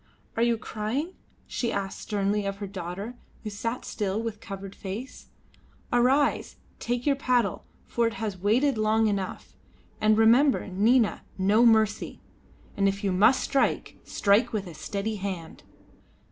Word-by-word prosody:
"Are 230 Hz, -, 0 dB
you 235 Hz, -1 st, +3 dB
crying?" 235 Hz, -, -3 dB, 0.3 s
she 235 Hz, -2 st, -2 dB
asked 195 Hz, -3 st, -3 dB
sternly 205 Hz, 0 st, -1 dB
of 195 Hz, 0 st, -3 dB
her 200 Hz, -, -5 dB
daughter, 195 Hz, +3 st, -6 dB, 0.3 s
who 215 Hz, -, -5 dB
sat 230 Hz, +4 st, -4 dB
still 205 Hz, -1 st, -2 dB
with 225 Hz, -2 st, -4 dB
covered 195 Hz, -1 st, -8 dB
face. 210 Hz, +7 st, -7 dB, 0.7 s
"Arise, 260 Hz, +4 st, +2 dB
and -, -, -33 dB
take 245 Hz, 0 st, -2 dB
your 285 Hz, -2 st, +3 dB
paddle, 245 Hz, -7 st, 0 dB, 0.2 s
for 235 Hz, -1 st, +1 dB
he 230 Hz, -, -10 dB
has 215 Hz, -4 st, -3 dB
waited 225 Hz, +7 st, +2 dB
long 215 Hz, +1 st, +3 dB
enough. 200 Hz, -3 st, -3 dB, 0.5 s
And 215 Hz, 0 st, +4 dB
remember, 240 Hz, +6 st, +5 dB
Nina, 220 Hz, +5 st, +2 dB, 0.2 s
no 210 Hz, +5 st, +4 dB
mercy; 220 Hz, -2 st, +2 dB, 0.6 s
and 195 Hz, -, +2 dB
if 195 Hz, +1 st, -1 dB
you 195 Hz, -, +1 dB
must 215 Hz, +8 st, +4 dB
strike, 275 Hz, -, 0 dB
strike 205 Hz, +4 st, +2 dB
with 210 Hz, -3 st, -2 dB
a 175 Hz, -, -9 dB
steady 205 Hz, +6 st, -4 dB
hand." 185 Hz, -5 st, -6 dB
215 Hz, 150 wpm, -27 LUFS, 200-235 Hz, 0.7 s, remember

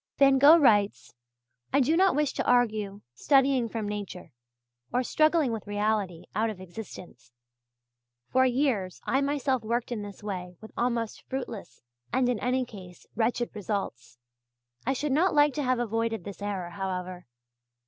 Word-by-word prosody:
Van 275 Hz, -1 st, +5 dB
Gogh 295 Hz, +5 st, +9 dB
writes: 210 Hz, -9 st, +3 dB, 0.6 s
"I 280 Hz, -, +3 dB
do 285 Hz, +4 st, +3 dB
not 380 Hz, +2 st, +4 dB
wish 295 Hz, -2 st, +1 dB
to -, -, -2 dB
argue 215 Hz, -5 st, +1 dB
studying 270 Hz, -, +3 dB
from 220 Hz, -1 st, -3 dB
nature, 205 Hz, -3 st, -6 dB, 0.6 s
or 250 Hz, -, +1 dB
struggling 310 Hz, 0 st, +2 dB
with 220 Hz, -2 st, -5 dB
reality, 205 Hz, -4 st, -1 dB
out 225 Hz, +1 st, +1 dB
of 210 Hz, -4 st, -7 dB
existence. 180 Hz, -, -10 dB, 1.0 s
For 260 Hz, 0 st, +3 dB
years 245 Hz, -8 st, 0 dB
I 270 Hz, -, +1 dB
myself 280 Hz, -2 st, 0 dB
worked 235 Hz, +2 st, -2 dB
in 230 Hz, -3 st, -2 dB
this 205 Hz, 0 st, -9 dB
way 180 Hz, -4 st, -5 dB
with 220 Hz, -, -12 dB
almost 235 Hz, -2 st, -1 dB
fruitless 240 Hz, -, -6 dB, 0.3 s
and 250 Hz, 0 st, +2 dB
in 240 Hz, -4 st, 0 dB
any 255 Hz, +3 st, 0 dB
case 185 Hz, -6 st, -12 dB
wretched 240 Hz, +1 st, 0 dB
results. 180 Hz, -, -4 dB, 0.7 s
I 265 Hz, -, +3 dB
should 290 Hz, +2 st, -2 dB
not 320 Hz, +5 st, +2 dB
like 290 Hz, -1 st, +5 dB
to 295 Hz, -, -2 dB
have 255 Hz, -1 st, +1 dB
avoided 225 Hz, -3 st, -1 dB
this 200 Hz, +1 st, -9 dB
error, 195 Hz, -4 st, -3 dB
however. 185 Hz, -2 st, -5 dB
225 Hz, 155 wpm, -28 LUFS, 200-260 Hz, 1.0 s, Gogh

